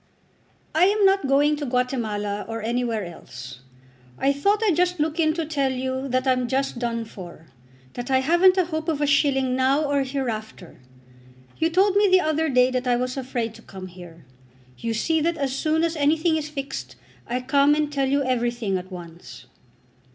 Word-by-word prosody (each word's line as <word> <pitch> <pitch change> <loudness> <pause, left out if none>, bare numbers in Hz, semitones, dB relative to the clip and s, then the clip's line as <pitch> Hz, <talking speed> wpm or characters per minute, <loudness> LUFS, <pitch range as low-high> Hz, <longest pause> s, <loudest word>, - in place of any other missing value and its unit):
"I 320 +4 +5
am 410 +1 +3
not 390 -6 +3
going 290 +2 +3
to 290 - -4
Guatemala 220 -5 -1
or 225 -1 -5
anywhere 230 -3 -1
else. 125 -7 -10 0.6
I 275 +1 +2
thought 400 +10 +1
I'd 395 -7 +3
just 360 0 +1
look 310 +2 -1
in 310 -1 +2
to 330 -2 -2
tell 280 -3 0
you 260 +1 -3
that 255 0 0
I'm 255 -2 +1
just 265 0 -1
done 230 -1 -2
for, 175 -6 -11 0.5
that 245 +1 -6
I 260 -1 +3
haven't 345 +6 +4
a 370 - +3
hope 315 -1 -3
of 310 -3 -1
a 295 - +2
shilling 275 -2 +2
now 265 +3 +2
or 285 -1 +1
hereafter. 235 - -5 0.8
You 325 - +2
told 385 +3 +3
me 410 0 +5
the 370 0 +6
other 315 -1 0
day 250 -1 +4
that 255 0 -2
I 245 - +3
was 250 +1 -2
afraid 245 -4 -3
to 230 - -14
come 190 -4 -10
here. 175 -4 -13 0.5
You 230 - -3
see 320 +8 +1
that 335 +1 0
as 275 -3 -1
soon 315 +3 +1
as 335 0 0
anything 315 +3 +2
is 305 -1 -3
fixed, 145 - -6 0.3
I 245 +2 -1
come 280 +3 +3
and 300 -1 -1
tell 275 -2 0
you 280 +1 +2
everything 240 -6 -1
at 185 +1 -12
once." 170 -7 -10
265 Hz, 190 wpm, -24 LUFS, 230-310 Hz, 0.8 s, the